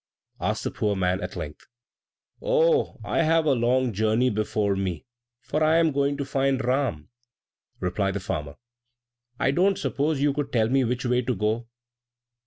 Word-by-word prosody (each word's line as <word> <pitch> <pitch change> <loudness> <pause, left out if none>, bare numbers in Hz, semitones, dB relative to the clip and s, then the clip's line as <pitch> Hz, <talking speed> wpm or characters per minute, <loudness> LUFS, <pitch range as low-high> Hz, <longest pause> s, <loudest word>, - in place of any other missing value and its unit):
asked - - -1
the - - -2
poor 105 -1 -1
man, 90 -1 0
at - - -5
length. 75 -1 -7 0.7
"Oh, - - +2
I - - 0
have 165 0 +3
a 145 - +4
long 125 0 +1
journey 110 +5 +2
before 105 -1 0
me, 95 -5 -3 0.4
for 155 +4 -1
I 155 +1 +4
am 165 -1 +3
going 140 0 0
to 140 - -3
find 135 -1 0
Ram!" 125 - -1 0.7
replied 95 +2 -1
the - - -1
farmer. 75 -7 -4 0.8
"I 130 - +2
don't 190 +6 +2
suppose 145 +1 -1
you 145 0 +2
could 140 0 -3
tell 110 -2 +2
me 135 +1 +3
which 125 +1 -2
way 125 0 +2
to 125 0 -1
go?" 110 +4 -1
125 Hz, 170 wpm, -25 LUFS, 105-145 Hz, 0.8 s, a